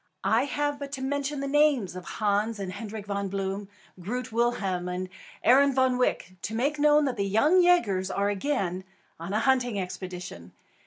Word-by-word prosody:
I -, -, +3 dB
have 290 Hz, 0 st, -2 dB
but 280 Hz, -1 st, -6 dB
to 265 Hz, -, -4 dB
mention 285 Hz, +1 st, -2 dB
the 275 Hz, -, -2 dB
names 280 Hz, -10 st, +2 dB
of 185 Hz, -1 st, -8 dB
Hans 210 Hz, +1 st, 0 dB
and 190 Hz, -2 st, -5 dB
Hendrik 210 Hz, 0 st, -7 dB
Von 200 Hz, -1 st, -2 dB
Bloom, 195 Hz, +1 st, -3 dB, 0.3 s
Groot 245 Hz, +7 st, -4 dB
Willem 205 Hz, -6 st, 0 dB
and 180 Hz, +1 st, -4 dB, 0.4 s
Arend 275 Hz, +2 st, +5 dB
Van 260 Hz, -1 st, +2 dB
Wyk, 185 Hz, -6 st, -1 dB
to 220 Hz, -, -4 dB
make 285 Hz, +6 st, 0 dB
known 300 Hz, 0 st, +5 dB
that 255 Hz, -4 st, -2 dB
The 200 Hz, -1 st, 0 dB
Young 295 Hz, -, +4 dB
Yagers 210 Hz, -, +3 dB
are 200 Hz, +1 st, 0 dB
again 190 Hz, -5 st, -2 dB, 0.4 s
on 170 Hz, +3 st, -6 dB
a 215 Hz, -, +1 dB
hunting 250 Hz, -5 st, +2 dB
expedition. 180 Hz, -, -7 dB
220 Hz, 175 wpm, -27 LUFS, 190-275 Hz, 0.4 s, Arend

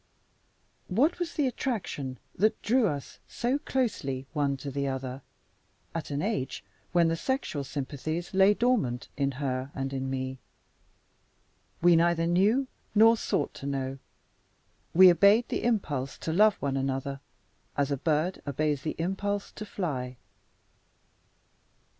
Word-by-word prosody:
What 275 Hz, -, +2 dB
was 345 Hz, -1 st, -3 dB
the 295 Hz, -, +2 dB
attraction 200 Hz, -, -3 dB, 0.2 s
that 215 Hz, +4 st, +2 dB
drew 235 Hz, +1 st, +3 dB
us 145 Hz, -5 st, -5 dB
so 250 Hz, +4 st, -1 dB
closely 140 Hz, -, -1 dB
one 140 Hz, -3 st, 0 dB
to 140 Hz, +1 st, -6 dB
the 140 Hz, +1 st, -1 dB
other, 130 Hz, 0 st, -4 dB, 0.7 s
at 165 Hz, -1 st, -4 dB
an 145 Hz, +2 st, -2 dB
age 195 Hz, -, -2 dB, 0.3 s
when 175 Hz, -2 st, +4 dB
the 165 Hz, -, +1 dB
sexual 215 Hz, -, -2 dB
sympathies 150 Hz, +6 st, -4 dB
lay 195 Hz, +2 st, +5 dB
dormant 205 Hz, -, +1 dB
in 140 Hz, -1 st, 0 dB
her 130 Hz, -1 st, -2 dB
and 135 Hz, 0 st, -3 dB
in 135 Hz, 0 st, -2 dB
me? 130 Hz, 0 st, -3 dB, 1.4 s
We 175 Hz, -1 st, +7 dB
neither 165 Hz, 0 st, +3 dB
knew 200 Hz, +10 st, +3 dB, 0.3 s
nor 225 Hz, +2 st, +7 dB
sought 150 Hz, -9 st, -1 dB
to 140 Hz, -, -7 dB
know. 135 Hz, -1 st, -3 dB, 1.0 s
We 185 Hz, +1 st, +10 dB
obeyed 200 Hz, +7 st, +5 dB
the -, -, -2 dB
impulse 150 Hz, -, -1 dB
to 160 Hz, -, -3 dB
love 210 Hz, +3 st, +5 dB
one 135 Hz, -1 st, -2 dB
another, 135 Hz, +1 st, -2 dB, 0.6 s
as 140 Hz, 0 st, +1 dB
a 140 Hz, -, +1 dB
bird 160 Hz, +5 st, 0 dB
obeys 145 Hz, 0 st, 0 dB
the 155 Hz, -, -3 dB
impulse 200 Hz, +4 st, -2 dB
to 215 Hz, -, -8 dB
fly. 130 Hz, -11 st, -3 dB
155 Hz, 135 wpm, -28 LUFS, 135-205 Hz, 1.4 s, We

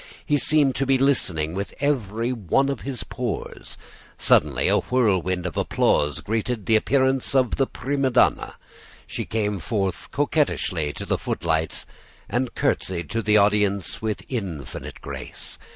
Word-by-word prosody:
He 145 Hz, -2 st, +2 dB
seemed 145 Hz, -3 st, +3 dB
to 135 Hz, -, 0 dB
be 135 Hz, 0 st, +4 dB
listening 90 Hz, -, +1 dB
with 100 Hz, +2 st, -4 dB
every 120 Hz, -4 st, 0 dB
one 125 Hz, +5 st, +1 dB
of 140 Hz, -, -3 dB
his 135 Hz, -3 st, -4 dB
pores. 125 Hz, -4 st, -4 dB, 0.4 s
Suddenly -, -, +3 dB
a -, -, +4 dB
whirlwind 95 Hz, -8 st, +1 dB
of 90 Hz, -, -3 dB
applause 75 Hz, -1 st, +1 dB
greeted 110 Hz, 0 st, -2 dB
the 110 Hz, -, +4 dB
appearance 130 Hz, +3 st, +2 dB
of 130 Hz, -3 st, +3 dB
the 135 Hz, -, +2 dB
prima 135 Hz, +1 st, -1 dB
donna. 125 Hz, -, +2 dB, 0.5 s
She -, -, -4 dB
came 105 Hz, -3 st, -1 dB
forward 95 Hz, +4 st, 0 dB, 0.2 s
coquettishly 140 Hz, -, 0 dB
to -, -, -6 dB
the -, -, 0 dB
footlights 80 Hz, -2 st, -1 dB, 0.4 s
and 125 Hz, 0 st, -1 dB
curtsied 85 Hz, -4 st, -1 dB
to 115 Hz, -, 0 dB
the 105 Hz, -1 st, +4 dB
audience 100 Hz, -2 st, +2 dB
with 110 Hz, -2 st, -3 dB
infinite 85 Hz, -, -5 dB
grace. 65 Hz, -3 st, -6 dB
110 Hz, 145 wpm, -24 LUFS, 95-130 Hz, 0.5 s, be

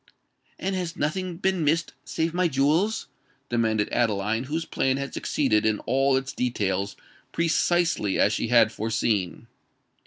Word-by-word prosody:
"And 190 Hz, +1 st, -2 dB
has 175 Hz, -3 st, -3 dB
nothing 175 Hz, +3 st, -2 dB
been 190 Hz, -2 st, 0 dB
missed 160 Hz, +3 st, +1 dB
save 160 Hz, +5 st, -2 dB
my 180 Hz, 0 st, +2 dB
jewels?" 155 Hz, +9 st, +1 dB, 0.4 s
demanded 110 Hz, -3 st, +1 dB
Adeline, 110 Hz, 0 st, 0 dB
whose 160 Hz, +4 st, -3 dB
plan 135 Hz, -3 st, 0 dB
had 140 Hz, 0 st, -5 dB
succeeded 110 Hz, -8 st, +1 dB
in 110 Hz, -1 st, +2 dB
all 135 Hz, +2 st, +2 dB
its 135 Hz, +1 st, -4 dB
details 100 Hz, -5 st, -1 dB, 0.4 s
precisely 165 Hz, -, +1 dB
as 105 Hz, -, +4 dB
she 105 Hz, -, -1 dB
had 115 Hz, -2 st, +5 dB
foreseen. 105 Hz, -4 st, -1 dB
135 Hz, 135 wpm, -25 LUFS, 110-165 Hz, 0.4 s, had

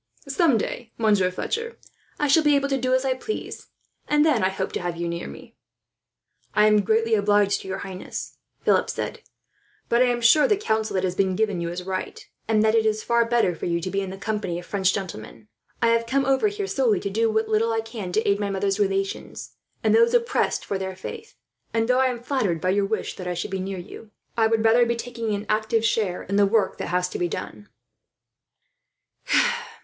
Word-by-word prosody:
Some 275 Hz, -2 st, +3 dB
day, 230 Hz, +2 st, -4 dB
Monsieur 205 Hz, -5 st, +3 dB
Fletcher, 460 Hz, -, -4 dB, 0.4 s
I 295 Hz, -, +2 dB
shall 285 Hz, +3 st, +5 dB
be 295 Hz, -1 st, +4 dB
able 280 Hz, 0 st, +1 dB
to 270 Hz, -, +1 dB
do 255 Hz, 0 st, +2 dB
as 260 Hz, +1 st, 0 dB
I 265 Hz, -, +2 dB
please, 345 Hz, +12 st, -6 dB, 0.4 s
and 295 Hz, 0 st, +3 dB
then 275 Hz, -10 st, +3 dB
I 185 Hz, -, +3 dB
hope 190 Hz, 0 st, -3 dB
to -, -, -3 dB
have 175 Hz, -1 st, -3 dB
you 170 Hz, 0 st, -2 dB
near 170 Hz, 0 st, -4 dB
me." -, -, -12 dB, 1.0 s
"I 210 Hz, 0 st, +5 dB
am 210 Hz, -1 st, +5 dB
greatly 225 Hz, +3 st, +1 dB
obliged 205 Hz, -1 st, +3 dB
to -, -, -10 dB
your 190 Hz, 0 st, -3 dB
Highness," 190 Hz, -2 st, -7 dB, 0.3 s
Philip -, -, +3 dB
said; -, -, -4 dB, 0.7 s
"but 235 Hz, +1 st, +3 dB
I 255 Hz, -, +5 dB
am 245 Hz, -1 st, 0 dB
sure 240 Hz, +6 st, +5 dB
the 420 Hz, -, +2 dB
counsel 220 Hz, -, -1 dB
that 185 Hz, -, 0 dB
has 185 Hz, -1 st, 0 dB
been 190 Hz, 0 st, +1 dB
given 205 Hz, -4 st, 0 dB
you 170 Hz, -, -2 dB
is 175 Hz, +1 st, -5 dB
right, 185 Hz, 0 st, -5 dB, 0.2 s
and 215 Hz, -1 st, +3 dB
that 220 Hz, 0 st, +3 dB
it 225 Hz, -1 st, +4 dB
is 215 Hz, 0 st, 0 dB
far 235 Hz, 0 st, +2 dB
better 230 Hz, -6 st, +2 dB
for 165 Hz, -, -5 dB
you 170 Hz, 0 st, 0 dB
to 185 Hz, +2 st, -4 dB
be 195 Hz, -, 0 dB
in 195 Hz, -, -4 dB
the 190 Hz, -, -7 dB
company 210 Hz, -4 st, -3 dB
of 175 Hz, -, -8 dB
French 190 Hz, -2 st, +1 dB
gentlemen. 190 Hz, -, -7 dB, 0.3 s
I 230 Hz, -, +5 dB
have 230 Hz, 0 st, +2 dB
come 275 Hz, +3 st, +1 dB
over 270 Hz, +9 st, +3 dB
here 410 Hz, -1 st, -3 dB
solely 250 Hz, -, +1 dB
to 200 Hz, -, -3 dB
do 225 Hz, +3 st, +1 dB
what 220 Hz, 0 st, 0 dB
little 220 Hz, +1 st, +1 dB
I 225 Hz, 0 st, 0 dB
can 225 Hz, -5 st, -7 dB
to 220 Hz, -, +1 dB
aid 200 Hz, 0 st, +2 dB
my 205 Hz, -1 st, -1 dB
mother's 195 Hz, +1 st, -1 dB
relations, 195 Hz, -1 st, -2 dB, 0.3 s
and -, -, +3 dB
those 465 Hz, +1 st, +5 dB
oppressed 475 Hz, 0 st, +1 dB
for 195 Hz, -, -2 dB
their 190 Hz, 0 st, -4 dB
faith; 445 Hz, -, -9 dB, 0.4 s
and 225 Hz, 0 st, +2 dB
though 250 Hz, +1 st, +3 dB
I 260 Hz, -, +4 dB
am 245 Hz, -2 st, -4 dB
flattered 225 Hz, -, 0 dB
by 185 Hz, -, -1 dB
your 200 Hz, +1 st, +2 dB
wish 220 Hz, +1 st, -3 dB
that 185 Hz, -, -6 dB
I 180 Hz, -, -2 dB
should 175 Hz, -, -4 dB
be 190 Hz, -, -2 dB
near 190 Hz, +1 st, -4 dB
you, 200 Hz, +4 st, -10 dB, 0.3 s
I 225 Hz, -1 st, +3 dB
would 225 Hz, 0 st, +1 dB
rather 230 Hz, +2 st, +5 dB
be 235 Hz, -, 0 dB
taking 230 Hz, -2 st, -3 dB
an 205 Hz, +1 st, -5 dB
active 220 Hz, +1 st, +1 dB
share 205 Hz, -6 st, 0 dB
in 200 Hz, +2 st, -2 dB
the 205 Hz, -1 st, +5 dB
work 205 Hz, -2 st, +1 dB
that -, -, -3 dB
has 180 Hz, 0 st, 0 dB
to -, -, -5 dB
be 175 Hz, -, +1 dB
done." 105 Hz, -9 st, -7 dB
215 Hz, 225 wpm, -24 LUFS, 190-240 Hz, 1.0 s, shall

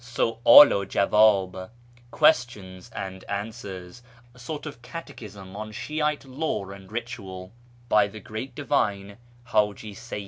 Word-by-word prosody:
Su'dl 120 Hz, +2 st, +6 dB
u 100 Hz, -, 0 dB
Jawdh 100 Hz, -2 st, +2 dB, 0.4 s
("Questions 120 Hz, -, +1 dB
and 95 Hz, -1 st, -6 dB
Answers"), 100 Hz, -1 st, -7 dB, 0.3 s
a 125 Hz, -, -19 dB
sort 145 Hz, +4 st, -6 dB
of 145 Hz, -6 st, -9 dB
catechism 105 Hz, -, -10 dB
on 110 Hz, +1 st, -6 dB
Shi'ite 150 Hz, +5 st, -2 dB
law 130 Hz, -8 st, -3 dB
and 100 Hz, 0 st, -12 dB
ritual, 100 Hz, -6 st, -7 dB, 0.4 s
by 105 Hz, -3 st, +4 dB
the 110 Hz, +2 st, -10 dB
great 110 Hz, +6 st, -7 dB
divine 100 Hz, -8 st, -1 dB, 0.3 s
Htiji 105 Hz, -1 st, 0 dB
556 -, -, -7 dB
110 Hz, 125 wpm, -25 LUFS, 100-125 Hz, 0.4 s, Su'dl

